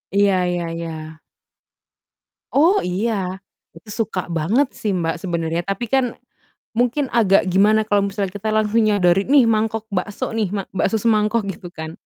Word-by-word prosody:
Iya 200 -1 +4 0.2
iya 175 -1 -2 0.2
iya. 170 0 -4 1.6
Oh, 335 +8 +4
iya. 190 0 -2 0.3
Itu 230 - -17 0.2
suka 190 -4 -5
banget 175 - +1
sih, 210 - -2
Mbak, 165 -3 -1
sebenarnya. 170 -2 -1
Tapi 195 +6 -3
kan, 265 +2 +2 0.7
mungkin 245 +4 0
agak 205 -5 +4
gimana 210 +3 +4
kalau 205 -2 +1
misalnya 195 -1 -3
kita 205 +2 -4
langsung 215 +1 +2
nyodori, 195 -3 +2
"Nih 275 -2 +6
mangkok 225 -1 0
bakso 200 +3 -3
nih, 220 -3 0
mak 195 - -4
bakso 195 +2 0
semangkok." 215 0 +1
Gitu 175 0 -10
kan? 160 0 -6
205 Hz, 150 wpm, -20 LUFS, 185-225 Hz, 1.6 s, Nih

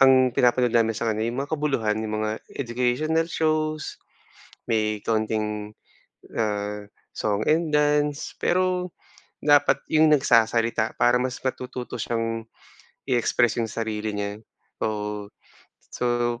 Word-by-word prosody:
ang 130 -1 +6
pinapanood 125 -1 +3
namin 115 -1 +3
sa 115 - -1
kanya 110 +1 -1
'yong 125 +4 -2
makabuluhan, 140 -8 0
yung 110 0 -2
mga 110 +1 -2 0.2
educational 135 +6 0
shows 155 -1 -1 0.7
may 110 -2 +1
kaunting, 110 -1 -1 0.6
ah, 105 -1 -2 0.3
song 105 0 -1
and 160 0 +1
dance 150 0 +1
pero, 180 0 +1 0.5
dapat 145 -1 +5 0.2
yung 155 0 +6
nagsasalita 115 -4 +2
para 120 +1 +4
mas 130 -1 -2
matututo 125 -1 -4
siyang 115 -1 -2 0.7
i-express 120 -1 +2
yung 115 - -2
sarili 110 -1 -3
niya, 100 0 -3 0.4
oo. 105 -1 -3 0.6
So, 120 -1 0
120 Hz, 115 wpm, -25 LUFS, 110-145 Hz, 0.7 s, ang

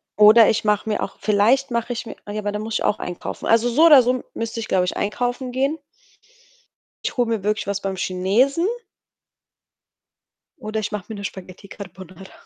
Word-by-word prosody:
oder 215 +2 +7
ich 220 - 0
mache 210 0 0
mir 215 - -1
auch - - -7
vielleicht 220 +6 +2
mache 235 +1 -2
ich 235 - -6
mir - - -8
ah, 205 - -7
ja, 215 - -3
aber 205 0 -3
dann 210 0 -4
muss 220 0 -4
ich - - -1
auch - - 0
einkaufen. 175 -1 -6
Also, 230 +1 +3
so 300 +8 +4
oder 285 -6 +8
so 250 +1 0
müsste 230 0 -4
ich, 225 - -5
glaube 180 -1 +1
ich, - - -3
einkaufen 245 +4 -2
gehen. 275 +5 -1 1.3
Ich - - -3
hole 240 -2 +1
mir 225 -4 -2
wirklich 210 0 -1
was 200 0 -2
beim 195 -1 -3
Chinesen 200 - +1 1.9
oder 220 -3 -4
ich 210 0 -4
mache 210 -3 -5
mir 220 - -6
'ne 200 - -8
Spaghetti 190 0 -9
Carbonara. 190 -1 -11
215 Hz, 200 wpm, -21 LUFS, 200-245 Hz, 1.9 s, oder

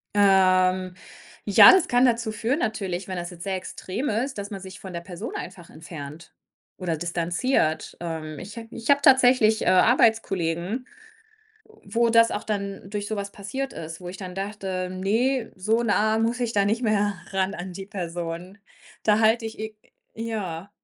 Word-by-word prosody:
Ähm, 185 -2 +4 0.5
ja, 205 - +9
das 370 -3 +4
kann 245 +1 +4
dazu 230 -2 +1
führen 230 +7 -1
natürlich, 195 - -2
wenn 185 - -4
das 175 -1 -4
jetzt 170 -1 -10
sehr 195 -1 -2
extrem 185 +6 -4
ist, 245 +5 -2
dass 200 0 -6
man 200 - -5
sich 190 0 -10
von 190 -2 -9
der 170 - -3
Person 175 0 -7
einfach 180 -2 -8
entfernt 155 0 -10 0.4
oder 170 -4 -2
distanziert. 170 - -1
Ähm, 160 -3 -5
ich 200 +5 -9
habe 225 -1 -7
ich 230 -1 -7
habe 285 0 +5
tatsächlich, 250 -5 +5
äh, - - -2
Arbeitskollegen, 195 -1 +2 0.8
wo 405 - -1
das 230 0 +5
auch - - -3
dann 200 -2 -4
durch 205 0 -4
so 220 - -2
was 200 0 -5
passiert 265 +6 -5
ist, 165 +1 -8
wo 180 - -7
ich 180 - -7
dann 185 -2 -8
dachte: 195 -2 -3
„Ne, 225 +7 0
so 220 +5 +1
nah 215 0 +2
muss 230 +2 0
ich 235 -2 -1
da 200 -2 +2
nicht 220 +4 0
mehr 205 -2 +1 0.2
ran 195 +1 0
an 180 +1 -6
die 195 +2 -8
Person.“ 175 0 -5 0.4
Da 210 -1 +3
halte 225 +1 +3
ich 220 - -8
e 220 0 -5 0.4
ja. 205 -6 -5
200 Hz, 175 wpm, -25 LUFS, 180-225 Hz, 0.8 s, ja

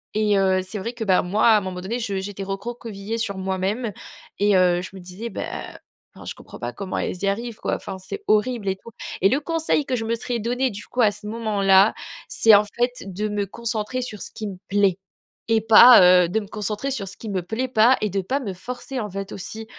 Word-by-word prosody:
et 210 -2 +2
heu, 190 -1 +2
c'est 190 +3 -7
vrai 230 +5 -4
que, 230 - -5
bah, 190 -4 +3
moi, 205 +6 +2
à 220 -2 +7
un 210 - 0
moment 185 -1 -5
donné, 220 +6 -3
je 200 -5 -2
j'étais 195 0 -6
recroquevillée 205 +1 -5
sur 200 -4 -3
moi-même 190 +5 -2 0.5
et 205 -1 +3
heu, 180 -1 +3
je - - -7
me 190 - -8
disais: 185 +6 -7
«Bah, - - -5
heu, - - -6 0.4
enfin, - - -12
je - - -6
comprends - - -13
pas 120 - -4
comment 195 -2 -4
elles - - -2
y - - +1
arrivent, 225 +3 -2
quoi. - - -2
Enfin, 190 - -7
c'est 190 - -8
horrible 215 0 +1
et 190 - 0
tout», 230 +4 -14 0.3
et 195 - +5
le 265 - +2
conseil 320 -1 0
que 255 - 0
je 225 -2 -3
me 230 - 0
serais 235 +1 -2
donné, 245 +4 0
du 205 -1 -9
coup, 250 - -2
à 220 - +6
ce 210 +1 -13
moment-là, 210 -3 +3 0.3
c'est, 225 - +4
en 205 0 +7
fait, 240 +4 -1 0.2
de 210 +4 -2
me 205 -1 -2
concentrer 235 +3 -3
sur 215 -4 -7
ce - - -5
qui 220 - -7
me 195 -2 -7
plaît 195 -2 +2 0.5
et 225 -1 +3
pas, 225 +3 +9 0.3
heu, - - -5
de 220 - +1
me 205 - -8
concentrer 210 +6 -3
sur 210 -7 -3
ce 190 - -10
qui 220 - -7
me 190 -2 -1
plaît 220 +9 -3
pas 245 +1 +4
et 210 - 0
de 195 - 0
pas 260 +9 -1
me 210 -8 -5
forcer, 250 +7 -6
en 210 - -4
fait, 195 +1 -6
aussi. 220 +4 -7
210 Hz, 245 wpm, -23 LUFS, 195-235 Hz, 0.5 s, pas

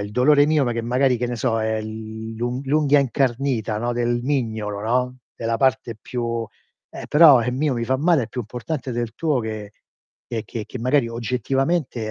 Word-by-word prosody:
il 100 0 -5
dolore 145 +5 +5
mio 155 -3 +3
ma 120 - 0
che 115 - -2
magari 125 +2 +2
che 125 - -1
ne 120 0 -3
so 115 -1 0
è 110 0 -1
l'u 110 +3 -5
l'unghia 145 0 +3
incarnita, 125 -3 0
no, 120 +2 -1
del 120 0 0
mignolo, 110 -7 -2
no, 125 +3 0 0.2
della 115 0 -2
parte 120 -4 +1
più 115 -1 -3 0.4
eh, - - -8
però 150 -6 +7
il 125 - -1
mio 140 0 0
mi 115 - -2
fa 130 +2 +1
male 160 -1 +3
è - - -12
più 125 - -4
importante 125 +4 -5
del 120 -1 -3
tuo 150 -3 0
che 110 -2 -6 0.5
che 115 -3 -3
che 115 +2 -6
magari 125 +1 +2
oggettivamente 125 +2 -1
120 Hz, 185 wpm, -22 LUFS, 115-135 Hz, 0.5 s, però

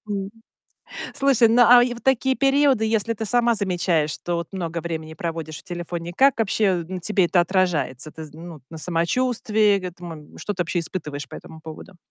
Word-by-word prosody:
М. 195 -1 -3 0.8
Слушай, 270 -5 +4
ну 240 +2 +5
а 245 +1 +8
и 245 0 0
в 240 - -10
такие 265 0 +2
периоды, 275 -4 +3
если 220 +1 +1
ты 220 - -4
сама 235 +1 +2
замечаешь, 175 -6 0
что 175 +3 -4
вот 170 +1 -4
много 170 -3 -3
времени 160 -1 -5
проводишь 160 -2 -5
в - - -20
телефоне, 175 -1 -5
как 275 -1 +4
вообще 210 -2 +2
на 185 +1 -5
тебе 195 +1 +2
это 175 0 +3
отражается? 170 -6 0
Ты 160 - -8
з 150 - -13
ну 165 +1 -9
вот 145 - -15
на 160 - -8
самочувствии 210 +4 +1
г 185 - -6
этому 170 -4 -11
Что 205 - -3
ты 180 -3 -1
вообще 175 +1 -2
испытываешь 150 -4 -5
по - - -11
этому 160 - -11
поводу? 160 +4 -11
185 Hz, 200 wpm, -23 LUFS, 165-225 Hz, 0.8 s, а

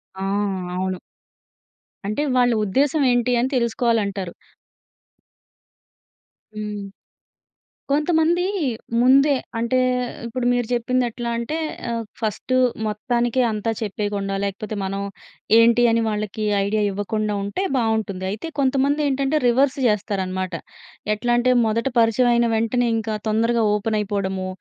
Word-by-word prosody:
ఆ! 190 - -8 0.5
అవును. 185 0 -2 1.1
అంటే 215 +8 -1
వాళ్ళ 245 -1 +4
ఉద్దేశం 280 +9 +1
ఏంటి 245 0 +1
అని 255 +2 +1
తెలుసుకోవాలి 235 -1 +1
అంటారు. 195 -3 -4 2.2
హ్మ్. 210 -1 -4 1.1
కొంతమంది 320 +3 +2 0.6
ముందే 275 +3 +5 0.3
అంటే 235 +2 +1 0.5
ఇప్పుడు 240 +1 -3
మీరు 245 -2 0
చెప్పింది 250 +1 +1
ఎట్లా 235 +1 -5
అంటే 235 +7 -3 0.4
ఆహ్, 230 -1 -2 0.2
ఫస్ట్ 220 +3 -3 0.3
మొత్తానికే 240 +3 0
అంతా 215 +1 -1
చెప్పేయకుండా 205 -2 -2
లేకపోతే 200 +2 -4
మనం 195 +1 -3 0.6
ఏంటి? 235 +1 +5
అని 230 0 +2
వాళ్ళకి 215 0 -3 0.2
ఐడియా 210 +1 0
ఇవ్వకుండా 210 +2 -2
ఉంటే 205 - -3
బావుంటుంది. 220 -5 -1
అయితే 215 +10 -5
కొంతమంది 275 +2 +2
ఏంటంటే, 275 +2 +1
రివర్స్ 265 +4 +3
జేస్తారన్నమాట. 190 -3 -1 0.6
ఎట్లా 225 +3 -1
అంటే, 255 +1 +3
మొదట 225 +1 0
పరిచయం 230 +2 +3
అయిన 235 0 +3
వెంటనే 235 +2 +1
ఇంకా 220 -1 -2
తొందరగా 230 +2 +2
ఓపెన్ 215 +1 0
అయిపోవడము. 190 -2 -2
230 Hz, 115 wpm, -22 LUFS, 210-250 Hz, 2.2 s, ముందే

